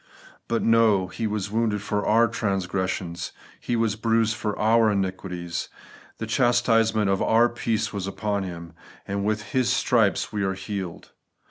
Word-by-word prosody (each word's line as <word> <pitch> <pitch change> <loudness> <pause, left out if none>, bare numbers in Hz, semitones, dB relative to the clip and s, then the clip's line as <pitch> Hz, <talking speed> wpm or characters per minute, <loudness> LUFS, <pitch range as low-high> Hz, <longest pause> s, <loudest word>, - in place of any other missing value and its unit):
But, 115 -1 0
no; 110 -5 +4
'He 115 +3 -3
was 105 -2 -3
wounded 110 -2 0
for 105 -1 -1
our 115 +2 +5
transgressions, 95 -5 -2 0.3
He 120 - -2
was 115 -2 +1
bruised 115 0 +1
for 105 -2 -3
our 110 +1 +4
iniquities; 95 -3 -3 0.5
the 115 - -4
chastisement 115 -2 +2
of 95 - 0
our 115 +2 +4
peace 115 -2 -2
was 100 -2 -3
upon 100 +1 -2
Him, 85 -3 -7 0.3
and 100 0 -2
with 105 0 -2
His 125 -1 +2
stripes 115 -6 +2
we 105 - -1
are 95 0 -1
healed.' 95 -3 -6
105 Hz, 150 wpm, -25 LUFS, 95-115 Hz, 0.5 s, our